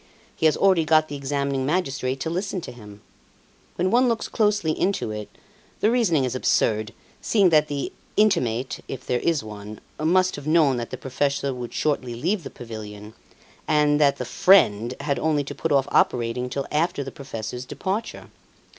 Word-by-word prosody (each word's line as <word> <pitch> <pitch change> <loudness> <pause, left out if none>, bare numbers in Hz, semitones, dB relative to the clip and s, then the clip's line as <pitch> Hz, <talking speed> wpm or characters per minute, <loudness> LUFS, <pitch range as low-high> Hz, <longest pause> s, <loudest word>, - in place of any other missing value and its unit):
He 160 - +3
has 155 - +2
already 190 -4 +4
got 155 0 +3
the 145 - -5
examining 140 -1 -2
magistrate 135 -4 -1
to 160 - -2
listen 185 +2 -2
to 125 - -8
him. 105 -4 -13 0.7
When 185 +1 0
one 250 +2 +4
looks 230 -1 -1
closely 210 -7 +1
into 185 - -1
it, 105 -1 -6 0.5
the 215 - +3
reasoning 195 - +2
is 125 - -1
absurd, 110 -4 +1 0.3
seeing 200 -5 +3
that 155 -2 +4
the 145 -2 -4 0.2
'intimate' 130 - +1
if 130 -1 -7
there 125 - 0
is 165 -6 0
one 105 0 -9 0.2
must 185 +3 +2
have 145 0 -8
known 155 -5 +4
that 120 -1 -4
the - - -6
professor 140 +1 -1
would 125 -1 -6
shortly 130 -5 -1
leave 180 - -1
the 145 - -8
pavilion, 105 -2 -9 0.5
and 150 0 +3
that 140 -1 +4
the 125 - -4
'friend' 125 - +4
had 140 - -1
only 155 -2 +1
to 140 - -7
put 165 - -3
off 135 -2 +3
operating 125 +1 +1
till 140 +1 -3
after 160 0 0
the 135 - -7
professor's 125 -3 -6
departure. 195 - -4
140 Hz, 175 wpm, -24 LUFS, 125-170 Hz, 0.7 s, already